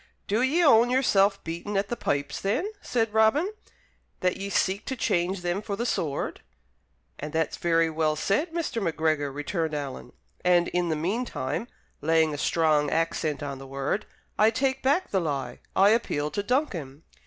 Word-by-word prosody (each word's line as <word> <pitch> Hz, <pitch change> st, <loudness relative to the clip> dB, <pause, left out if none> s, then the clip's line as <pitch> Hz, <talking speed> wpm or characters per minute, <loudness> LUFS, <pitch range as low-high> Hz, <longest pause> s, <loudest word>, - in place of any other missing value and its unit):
"Do 215 Hz, +4 st, +1 dB
ye 295 Hz, +7 st, +3 dB
own 240 Hz, -5 st, +6 dB
yourself 200 Hz, -6 st, +3 dB
beaten 170 Hz, +5 st, -4 dB
at 200 Hz, +1 st, 0 dB
the 240 Hz, -, -1 dB
pipes, 140 Hz, -8 st, -2 dB
then," 235 Hz, -, 0 dB
said 225 Hz, -3 st, -1 dB
Robin, 275 Hz, -, +3 dB, 0.7 s
"that 180 Hz, 0 st, +2 dB
ye 195 Hz, +1 st, -5 dB
seek 195 Hz, +1 st, +1 dB
to 265 Hz, -, -3 dB
change 180 Hz, -4 st, 0 dB
them 175 Hz, +3 st, -1 dB
for 205 Hz, -1 st, -4 dB
the 235 Hz, -, -2 dB
sword?" 150 Hz, -, -2 dB, 0.8 s
"And 150 Hz, +1 st, -5 dB
that's 160 Hz, -1 st, 0 dB
very 165 Hz, -1 st, +2 dB
well 155 Hz, -1 st, 0 dB
said, 200 Hz, -, 0 dB
Mr. 325 Hz, -9 st, -2 dB
Macgregor," 155 Hz, -4 st, 0 dB
returned 155 Hz, +2 st, -2 dB
Alan; 135 Hz, -4 st, -6 dB, 0.3 s
"and 175 Hz, -1 st, +4 dB
in 175 Hz, -1 st, 0 dB
the 160 Hz, -, +1 dB
meantime" 190 Hz, -, -2 dB, 0.3 s
(laying 160 Hz, 0 st, +3 dB
a 145 Hz, -, -5 dB
strong 155 Hz, -3 st, +2 dB
accent 160 Hz, -2 st, -1 dB
on 140 Hz, -2 st, -5 dB
the 135 Hz, -, -10 dB
word) 135 Hz, +8 st, -2 dB, 0.3 s
"I 215 Hz, +1 st, +6 dB
take 265 Hz, +3 st, 0 dB
back 285 Hz, +8 st, +1 dB
the 190 Hz, -, +2 dB
lie. 145 Hz, -5 st, -3 dB, 0.2 s
I 195 Hz, +2 st, +6 dB
appeal 150 Hz, -10 st, +1 dB
to 205 Hz, -, -1 dB
Duncan." 180 Hz, -, -2 dB
180 Hz, 170 wpm, -27 LUFS, 155-225 Hz, 0.8 s, own